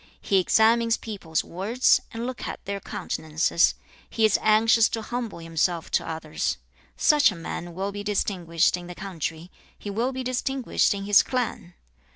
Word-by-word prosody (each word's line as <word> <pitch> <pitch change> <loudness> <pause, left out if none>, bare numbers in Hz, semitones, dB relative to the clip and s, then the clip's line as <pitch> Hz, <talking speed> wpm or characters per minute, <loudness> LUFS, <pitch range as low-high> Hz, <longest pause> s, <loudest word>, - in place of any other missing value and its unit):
He 195 - +2
examines 230 +4 +3
people's 185 -8 -3
words, 215 +9 +2
and 230 +1 -5
looks 255 0 -5
at - - -7
their 200 0 -3
countenances. 160 -1 0 0.3
He 225 - +2
is 215 - +3
anxious 220 +1 +4
to 225 -1 -4
humble 240 -3 -4
himself 165 +1 -1
to - - 0
others. 160 -1 -3 0.4
Such 295 -6 +5
a - - -7
man 170 +1 -6
will 195 +2 -2
be 205 0 -6
distinguished 180 -6 +1
in 175 -1 -9
the 180 - -8
country; 170 -2 -5 0.3
he 205 - -6
will 235 +6 -1
be 260 0 -4
distinguished 255 -3 0
in 195 - -5
his 205 0 +6
clan. 240 -8 -3
200 Hz, 165 wpm, -25 LUFS, 175-230 Hz, 0.4 s, his